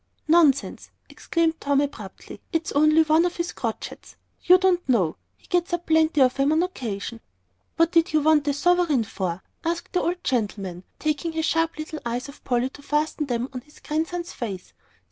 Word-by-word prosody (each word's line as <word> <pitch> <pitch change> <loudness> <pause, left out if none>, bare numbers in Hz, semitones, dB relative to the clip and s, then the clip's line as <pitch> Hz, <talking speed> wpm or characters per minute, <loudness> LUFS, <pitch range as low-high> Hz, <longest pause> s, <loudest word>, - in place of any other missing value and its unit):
"Nonsense!" 310 -4 +3 0.2
exclaimed 330 -1 -1
Tom, 285 -1 +2
abruptly. 230 -9 -5
"It's 325 -2 -1
only 305 +2 +5
one 315 +1 +4
of 355 0 -1
his 340 0 -2
crotchets. - - -6 0.3
You 365 +1 +7
don't 365 -4 +1
know; 185 -10 +2 0.2
he - - -26
gets 355 -1 0
up 345 0 -2
plenty 315 -2 +3
of 255 +1 +3
'em 275 +2 +3
on 320 +2 +3
occasion." 230 - -5 0.6
"What 330 0 +3
did 330 -1 +3
you 310 - +3
want 300 -1 +3
a 285 - +2
sovereign 340 -4 +2
for?" 190 -4 -4 0.2
asked 335 +1 -3
the 360 - +2
old 350 +1 -2
gentleman, 200 -7 -2
querulously, - - -39
taking 305 +2 -1
his 320 0 -1
sharp 330 -1 0
little 310 0 -6
eyes 240 +2 -3
off 280 - -13
Polly 250 +1 0
to 285 - -13
fasten 300 +1 -1
them 245 0 -2
on 250 - -5
his 295 +3 -20
grandson's 335 +3 -3
face. 195 -7 -6
305 Hz, 185 wpm, -24 LUFS, 250-330 Hz, 0.6 s, You